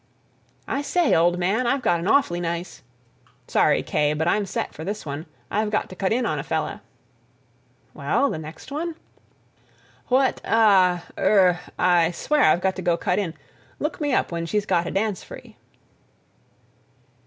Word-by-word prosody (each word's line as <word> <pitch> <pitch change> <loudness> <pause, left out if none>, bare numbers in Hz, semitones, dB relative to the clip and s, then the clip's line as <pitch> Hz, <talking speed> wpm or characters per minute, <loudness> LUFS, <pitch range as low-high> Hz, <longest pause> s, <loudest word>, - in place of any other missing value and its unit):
"I 275 - -1
say, 340 +2 +1
old 175 +2 +3
man, 200 +8 0
I've 270 +1 0
got 170 -1 +2
an 170 - -4
awfully 210 -10 +3
nice—" 170 -6 -4 0.7
"Sorry, - - +2
Kaye, 150 0 0
but 160 +2 -1
I'm 205 +2 +1
set - - -3
for 155 - -8
this 205 +4 -5
one. 145 +3 -6 0.2
I've 215 +1 0
got 215 - -1
to 185 - -10
cut 190 0 -1
in 240 +2 +1
on 155 -8 -1
a - - -4
fella." 160 -1 -3 1.1
"Well, 225 - 0
the - - -4
next 160 - -10
one?" 325 +3 -3 1.1
"What—ah—er—I 260 +1 +2 1.7
swear 295 - +1
I've 170 +3 +4
got 190 0 0
to - - -4
go 175 -1 +1
cut 180 +3 0
in—look 205 - -6
me 290 -1 0
up 255 - +1
when 170 0 -3
she's 210 +3 -1
got 175 -3 +1
a - - -3
dance 200 -1 -1
free." - - -12
185 Hz, 155 wpm, -23 LUFS, 165-245 Hz, 1.7 s, I've